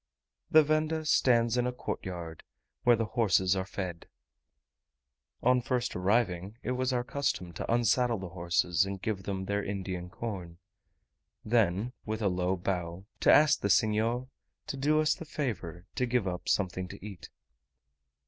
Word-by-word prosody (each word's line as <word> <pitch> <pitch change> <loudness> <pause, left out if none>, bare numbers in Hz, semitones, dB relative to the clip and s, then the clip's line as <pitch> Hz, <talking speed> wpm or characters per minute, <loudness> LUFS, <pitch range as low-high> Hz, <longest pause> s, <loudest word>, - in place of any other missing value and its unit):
The 155 0 +7
venda 155 +1 0
stands 120 -5 +3
in 125 0 +2
a - - 0
courtyard, 85 -9 -6 0.4
where 120 -1 +5
the 115 0 -1
horses 100 -5 +2
are 95 0 -2
fed. 90 -2 -5 1.4
On 125 0 +4
first 125 0 -1
arriving 100 0 0
it - - -2
was 130 +1 0
our 125 -1 0
custom 130 -10 -2
to 85 - -4
unsaddle 120 0 +2
the 95 -2 -6
horses 85 0 +1
and 95 0 -4
give 105 -1 -2
them 95 -1 -3
their 100 +1 -1
Indian 95 -3 -4
corn; 90 -6 -6 0.9
then, 110 0 +1
with 110 0 -3
a 100 - +3
low 90 +1 0
bow, 90 0 -3
to - - +5
ask 150 0 +6
the 100 - 0
senhor 110 +5 +2 0.4
to - - -4
do 150 +3 +2
us 155 0 +3
the - - -8
favour 110 - -4
to 125 - 0
give 120 -4 +1
up 90 -1 -4
something 95 -2 0
to 100 +2 -10
eat. 100 -4 -9
105 Hz, 160 wpm, -30 LUFS, 90-125 Hz, 1.4 s, The